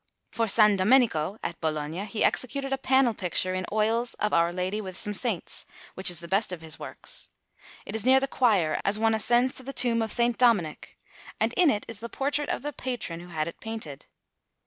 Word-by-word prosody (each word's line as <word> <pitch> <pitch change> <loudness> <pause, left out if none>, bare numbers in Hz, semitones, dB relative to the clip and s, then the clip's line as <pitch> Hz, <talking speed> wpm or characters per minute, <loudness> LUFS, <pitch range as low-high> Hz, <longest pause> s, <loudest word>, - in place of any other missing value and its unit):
For 230 - 0
S. 205 - +2
Domenico, 210 -4 +3
at 170 - -5
Bologna, 155 +4 -3
he 210 +1 -2
executed 275 +2 0
a 270 - -2
panel 265 -3 +3
picture 185 -1 -1
in 185 -1 -3
oils 225 +3 0
of 210 +1 -2
Our 170 0 +3
Lady 185 +4 -3
with 185 -3 -7
some 210 - -1
saints, 205 -3 -1 0.3
which 190 - +2
is 175 -1 +1
the 170 - -9
best 195 +3 0
of 180 -3 -6
his 160 -1 -4
works; - - -5 0.6
it - - -6
is 220 - +1
near 260 +2 +5
the 270 - -2
choir, 205 - +1
as 200 +1 +2
one 225 0 +2
ascends 240 +4 +2
to 260 - -3
the 275 +2 -6
tomb 235 -3 +4
of 220 - -2
S. 240 0 +3
Dominic, 210 -11 +1 0.4
and - - 0
in 355 -4 +4
it 210 -6 -1
is 230 -3 -7
the 235 +1 -7
portrait 285 +3 -2
of - - -3
the 295 0 -4
patron 245 -11 -5
who 175 - -11
had 160 -2 -3
it 170 - -8
painted. 220 -11 -8
215 Hz, 215 wpm, -26 LUFS, 180-245 Hz, 0.6 s, near